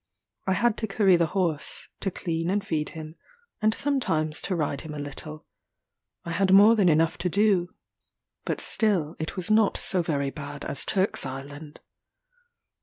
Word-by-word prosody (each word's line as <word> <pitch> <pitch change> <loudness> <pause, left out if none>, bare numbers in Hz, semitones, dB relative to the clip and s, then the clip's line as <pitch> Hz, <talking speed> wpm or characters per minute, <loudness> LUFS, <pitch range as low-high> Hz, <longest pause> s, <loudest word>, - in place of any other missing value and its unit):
I 190 - +3
had 235 +2 +1
to 220 - -2
curry 195 -2 +3
the 170 -1 +2
horse 165 -6 -1
to 195 - -1
clean 165 -2 -3
and 200 +1 -1
feed 155 -6 -2
him 155 0 -9 0.4
and 215 0 +3
sometimes 220 - -1
to 185 - -2
ride 145 -4 -2
him 155 -2 -8
a - - -6
little. 150 +2 -7 0.8
I 170 - -4
had 190 +3 +1
more 205 +4 +7
than 200 -5 +3
enough 160 +1 +2
to 180 +1 -1
do 195 -2 +1 0.7
but - - -3
still 180 -8 +1
it 160 - -4
was 185 +3 -2
not 215 -1 +3
so 185 - 0
very 140 -4 -1
bad 145 -1 -8
as 140 - -2
Turk's 190 0 +2
Island. 145 +3 -8
170 Hz, 170 wpm, -26 LUFS, 155-200 Hz, 0.8 s, more